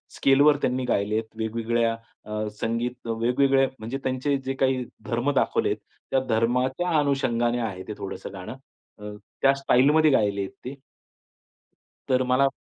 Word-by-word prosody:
स्केलवर 145 Hz, +2 st, +5 dB
त्यांनी 130 Hz, 0 st, 0 dB
गायले 105 Hz, -2 st, 0 dB
आहेत. 110 Hz, -, 0 dB
वेगवेगळ्या 115 Hz, +1 st, 0 dB, 0.3 s
अ, 105 Hz, 0 st, -3 dB
संगीत 115 Hz, +2 st, -2 dB
वेगवेगळ्या 130 Hz, +4 st, +2 dB
म्हणजे 115 Hz, +5 st, -4 dB
त्यांचे 130 Hz, +2 st, 0 dB
जे 135 Hz, -, -1 dB
काही 130 Hz, -1 st, +2 dB, 0.2 s
धर्म 120 Hz, +4 st, 0 dB
दाखवले -, -, +1 dB
आहेत, -, -, -1 dB, 0.3 s
त्या 135 Hz, -, +3 dB
धर्माच्या 125 Hz, +9 st, +1 dB
अनुषंगाने 120 Hz, -4 st, +1 dB
आहे 100 Hz, -5 st, -4 dB
ते 105 Hz, -, -4 dB
थोडंसं 100 Hz, 0 st, -7 dB
गाणं. 95 Hz, +4 st, -7 dB, 0.5 s
अ, 105 Hz, 0 st, -7 dB, 0.3 s
त्या 135 Hz, 0 st, +5 dB
स्टाईलमध्ये 145 Hz, +3 st, +4 dB
गायले 100 Hz, -6 st, +2 dB
आहेत 95 Hz, -, -4 dB
ते. 135 Hz, -, -5 dB, 1.3 s
तर 130 Hz, 0 st, +3 dB
मला 130 Hz, +2 st, +3 dB
125 Hz, 145 wpm, -25 LUFS, 110-135 Hz, 1.3 s, स्केलवर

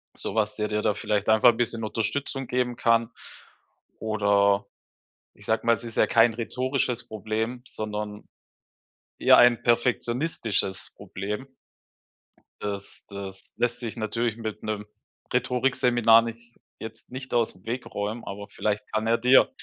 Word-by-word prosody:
sowas, 105 Hz, -1 st, -1 dB
der 105 Hz, -1 st, -1 dB
dir 105 Hz, 0 st, -1 dB
da 105 Hz, -, +2 dB
vielleicht 105 Hz, -1 st, -1 dB
einfach 110 Hz, +2 st, +7 dB
'n -, -, -10 dB
bisschen 115 Hz, -2 st, -1 dB
Unterstützung 135 Hz, +4 st, -2 dB
geben 125 Hz, -1 st, 0 dB
kann. 115 Hz, 0 st, +2 dB, 0.9 s
Oder 100 Hz, -2 st, +2 dB, 0.7 s
ich -, -, -15 dB
sage 110 Hz, +1 st, 0 dB
mal, 115 Hz, -, +5 dB
es 115 Hz, -, -11 dB
ist 115 Hz, -1 st, -8 dB
ja -, -, +4 dB
kein 115 Hz, 0 st, +5 dB
rhetorisches 125 Hz, +1 st, -2 dB
Problem, 110 Hz, +3 st, -3 dB
sondern 105 Hz, -1 st, -5 dB, 0.9 s
eher -, -, +7 dB
ein 120 Hz, -1 st, +6 dB
perfektionistisches 120 Hz, -, 0 dB
Problem. 105 Hz, +7 st, -5 dB, 1.1 s
Das 100 Hz, -1 st, -6 dB
das 100 Hz, -1 st, -9 dB
lässt 120 Hz, 0 st, 0 dB
sich 120 Hz, -1 st, -5 dB
natürlich 115 Hz, +1 st, -1 dB
mit 110 Hz, -2 st, -6 dB
'nem 105 Hz, -1 st, -3 dB, 0.5 s
Rhetorikseminar 125 Hz, -2 st, +4 dB
nicht 115 Hz, 0 st, -8 dB, 0.2 s
jetzt 110 Hz, 0 st, -9 dB
nicht 130 Hz, +1 st, -7 dB
aus 115 Hz, -2 st, +2 dB
dem 90 Hz, +2 st, -23 dB
Weg 125 Hz, +2 st, -3 dB
räumen, 105 Hz, +3 st, -4 dB
aber 100 Hz, +1 st, -7 dB
vielleicht 105 Hz, 0 st, -2 dB
kann 110 Hz, +1 st, 0 dB
er 115 Hz, +1 st, +3 dB
dir 125 Hz, -, +5 dB
115 Hz, 140 wpm, -26 LUFS, 105-120 Hz, 1.1 s, einfach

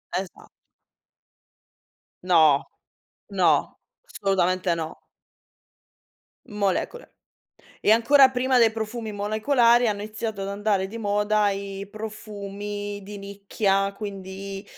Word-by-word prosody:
Esa 185 Hz, -1 st, -5 dB, 1.8 s
No. 160 Hz, -6 st, +4 dB, 0.7 s
No. -, -, +2 dB, 0.3 s
Assolutamente 185 Hz, -, 0 dB
no. 160 Hz, -1 st, -7 dB, 1.4 s
Molecole. 210 Hz, -, -2 dB, 0.7 s
E -, -, +2 dB
ancora 265 Hz, +4 st, +6 dB
prima 260 Hz, 0 st, +2 dB
dei 230 Hz, -2 st, +5 dB
profumi 220 Hz, 0 st, -5 dB
molecolari 230 Hz, +3 st, +3 dB
hanno 205 Hz, -1 st, -2 dB
iniziato 215 Hz, -1 st, -5 dB
ad 195 Hz, -, -4 dB
andare 200 Hz, -1 st, 0 dB
di 225 Hz, +4 st, -8 dB
moda 210 Hz, 0 st, +1 dB
i 195 Hz, 0 st, -5 dB
profumi 205 Hz, -1 st, -6 dB
di 205 Hz, +1 st, -9 dB
nicchia, 200 Hz, 0 st, -1 dB
quindi 195 Hz, -1 st, -7 dB
205 Hz, 95 wpm, -24 LUFS, 195-220 Hz, 1.8 s, ancora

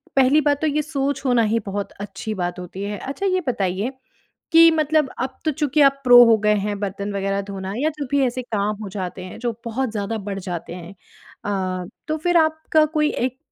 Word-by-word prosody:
पहली 270 Hz, +3 st, +5 dB
बात 285 Hz, -1 st, +2 dB
तो 315 Hz, -, +2 dB
ये 300 Hz, +1 st, +1 dB
सोच 285 Hz, -2 st, -2 dB
होना 245 Hz, -2 st, +3 dB
ही 230 Hz, -, +3 dB
बहुत 200 Hz, 0 st, -4 dB
अच्छी 205 Hz, +2 st, -6 dB
बात 175 Hz, +1 st, -3 dB
होती 180 Hz, +2 st, -7 dB
है। 205 Hz, 0 st, -4 dB
अच्छा, 280 Hz, +9 st, -4 dB
ये 370 Hz, -1 st, +1 dB
बताइए 200 Hz, -1 st, -1 dB, 0.6 s
कि 330 Hz, 0 st, +9 dB
मतलब 305 Hz, -2 st, +2 dB
अब 260 Hz, +1 st, -3 dB
तो 310 Hz, -, +2 dB
चूँकि 295 Hz, 0 st, +2 dB
आप 275 Hz, 0 st, +4 dB
प्रो 245 Hz, -1 st, +9 dB
हो 225 Hz, -1 st, +5 dB
गए 210 Hz, -, +4 dB
हैं, 205 Hz, -1 st, -3 dB
बर्तन 200 Hz, +1 st, -3 dB
वग़ैरह 195 Hz, 0 st, -1 dB
धोना 195 Hz, 0 st, -5 dB
या 295 Hz, +5 st, +1 dB
जो 285 Hz, -, -2 dB
भी 285 Hz, -1 st, +3 dB
ऐसे 250 Hz, +1 st, -3 dB
काम 210 Hz, 0 st, 0 dB
हो 200 Hz, -, -6 dB
जाते 185 Hz, -1 st, -5 dB
हैं, 185 Hz, -, -9 dB
जो 235 Hz, -1 st, -2 dB
बहुत 240 Hz, +1 st, -2 dB
ज़्यादा 210 Hz, +1 st, -3 dB
बढ़ 195 Hz, -, -3 dB
जाते 175 Hz, 0 st, -5 dB
हैं 180 Hz, +2 st, -10 dB, 0.5 s
अ, 185 Hz, -2 st, -2 dB, 0.2 s
तो 310 Hz, 0 st, -1 dB
फिर 350 Hz, -1 st, +3 dB
आपका 315 Hz, -1 st, +3 dB
कोई 300 Hz, 0 st, +3 dB
एक 255 Hz, +1 st, -2 dB
235 Hz, 215 wpm, -22 LUFS, 200-285 Hz, 0.6 s, कि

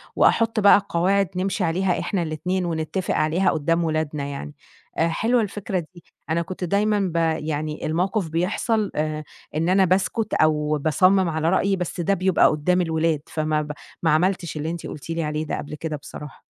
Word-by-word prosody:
وأحُط 225 Hz, -1 st, +3 dB
بقى 200 Hz, -1 st, +6 dB
قواعد 195 Hz, +3 st, +2 dB
نمشي 185 Hz, +1 st, -1 dB
عليها 180 Hz, +2 st, +1 dB
إحنا 185 Hz, -4 st, -1 dB
الاتنين 180 Hz, +4 st, -2 dB
ونتّفق 165 Hz, +2 st, -2 dB
عليها 160 Hz, +5 st, +2 dB
قُدّام 165 Hz, +3 st, +1 dB
ولادنا 155 Hz, -2 st, -1 dB
يعني. 140 Hz, +1 st, -6 dB, 0.4 s
آآ 165 Hz, -, +3 dB
حلوة 230 Hz, +8 st, +1 dB
الفكرة 200 Hz, -2 st, -3 dB, 0.2 s
دي، 175 Hz, -, -14 dB, 0.3 s
أنا 165 Hz, +2 st, +1 dB
كنت 185 Hz, +2 st, -6 dB
دايمًا 205 Hz, +3 st, +2 dB
ب -, -, -10 dB, 0.3 s
يعني 155 Hz, 0 st, -3 dB
الموقف 180 Hz, +3 st, 0 dB
بيحصل 200 Hz, +6 st, 0 dB
آآ 155 Hz, 0 st, -2 dB, 0.3 s
إن 165 Hz, +3 st, +1 dB
أنا 190 Hz, +1 st, +4 dB
باسكُت 195 Hz, +4 st, 0 dB
أو 150 Hz, -1 st, +2 dB
باصَمِّم 185 Hz, +5 st, +3 dB
على 160 Hz, 0 st, 0 dB
رأيي، 195 Hz, +1 st, +2 dB
بس 180 Hz, -1 st, -4 dB
ده 185 Hz, +4 st, +2 dB
بيبقى 185 Hz, -1 st, +3 dB
قُدّام 180 Hz, +4 st, +1 dB
الولاد، 160 Hz, -2 st, 0 dB
فما 155 Hz, -1 st, -1 dB
ب 150 Hz, 0 st, -5 dB, 0.3 s
ما 160 Hz, -, +3 dB
عملتش 175 Hz, 0 st, +1 dB
اللي 155 Hz, +1 st, -2 dB
أنتِ 170 Hz, 0 st, -5 dB
قُلتِ 150 Hz, -, -9 dB
لي 165 Hz, 0 st, -1 dB
عليه 150 Hz, +1 st, -2 dB
ده -, -, -3 dB
قبل 150 Hz, -, -6 dB
كده 155 Hz, 0 st, -4 dB
بصراحة. 150 Hz, 0 st, -10 dB
170 Hz, 175 wpm, -23 LUFS, 155-190 Hz, 0.4 s, بقى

